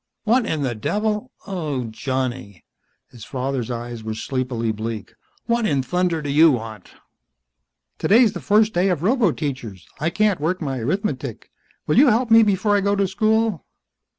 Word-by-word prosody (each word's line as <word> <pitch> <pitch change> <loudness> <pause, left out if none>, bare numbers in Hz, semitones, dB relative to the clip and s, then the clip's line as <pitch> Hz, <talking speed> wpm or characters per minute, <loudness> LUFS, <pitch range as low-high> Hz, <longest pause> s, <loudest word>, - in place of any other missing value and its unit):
"What 230 +1 +2
in 155 -3 -1
the 130 -3 -1
devil? 210 - -2
Oh, 155 -10 -3
Johnny." 120 - -4 0.5
His 120 -3 -12
father's 130 -1 -3
eyes 120 -1 -5
were 110 0 -4
sleepily 120 -1 -2
bleak. 110 -1 -5 0.3
"What 235 -1 +1
in 140 -3 +1
thunder 180 0 -1
do 145 - -4
you 160 +3 +6
want?" 110 -7 -4 1.1
"Today's 225 0 +4
the - - -5
first 215 +1 +3
day 180 +3 +2
of 175 -4 -1
roboteachers. 150 - -1 0.2
I 155 +3 0
can't 205 -2 +1
work 175 +4 0
my 135 -5 -3
arithmetic. 135 - -3 0.3
Will 150 - +3
you 285 - +7
help 235 0 +2
me 225 0 +8
before 205 0 +2
I 200 - +2
go 200 +1 +1
to 200 -1 +1
school?" 220 -1 +1
155 Hz, 160 wpm, -22 LUFS, 125-210 Hz, 1.1 s, me